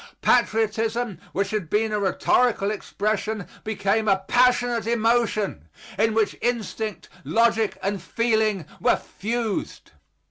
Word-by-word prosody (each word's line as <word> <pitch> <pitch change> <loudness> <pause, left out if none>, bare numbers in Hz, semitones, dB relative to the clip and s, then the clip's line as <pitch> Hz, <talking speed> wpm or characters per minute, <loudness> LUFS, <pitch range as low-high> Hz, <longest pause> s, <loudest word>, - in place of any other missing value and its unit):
Patriotism, 225 -3 +1
which 195 0 -1
had 210 -7 -2
been 215 +3 +1
a 210 - 0
rhetorical 205 +2 +2
expression, 215 0 -2 0.2
became 215 0 0
a 195 -1 +2
passionate 245 -2 +3
emotion, 225 - +1 0.3
in 220 +2 +1
which 220 -2 +1
instinct, 220 -4 -2 0.2
logic 225 -2 +2
and 195 -1 -1
feeling 220 -3 0
were - - +3
fused. 225 +1 -4
220 Hz, 110 wpm, -24 LUFS, 200-230 Hz, 0.3 s, passionate